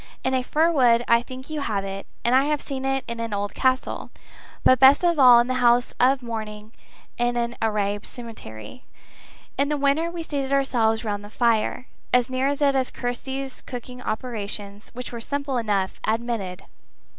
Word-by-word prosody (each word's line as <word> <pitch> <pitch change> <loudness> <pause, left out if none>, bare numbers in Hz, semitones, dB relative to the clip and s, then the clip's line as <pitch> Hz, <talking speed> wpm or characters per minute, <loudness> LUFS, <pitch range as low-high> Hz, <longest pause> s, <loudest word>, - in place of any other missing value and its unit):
In 260 - 0
a 260 - +2
fir 315 +6 +2
wood 240 -6 +4
I 235 0 +5
think 260 +3 -9
you 305 -2 -3
have 200 -7 -2
it; 195 0 -6 0.2
and 240 - +3
I 265 +2 +5
have 300 0 0
seen 270 -2 -5
it 270 0 0
in 235 0 -5
an 230 -2 -3
old 205 0 -3
castle; 260 -1 0 0.5
but 255 - +5
best 270 +6 +7
of 340 -3 +2
all 250 -3 +9
in 240 - +3
the 255 - -1
house 240 0 +3
of 260 +1 +3
mourning 215 -2 -6 0.5
in 240 0 +1
an 235 0 -1
Arab 205 -2 -1
cemetery. 230 - -10 0.8
In 280 +1 +2
the 300 - 0
winter, 285 +4 +1
we 340 -1 -5
seated 280 -4 -3
ourselves 235 -5 +1
round 205 -1 -2
the 205 - -10
fire 235 +2 +1 0.3
as 250 +1 +3
near 260 +1 +1
it 285 0 -1
as 270 -2 +2
Kirsty's 265 +2 -4
cooking 250 0 -8
operations, 210 -3 -5
which 250 0 -6
were 235 -1 -6
simple 280 +1 -2
enough, 205 -5 -1
admitted. 220 -5 -2
245 Hz, 180 wpm, -24 LUFS, 220-270 Hz, 0.8 s, all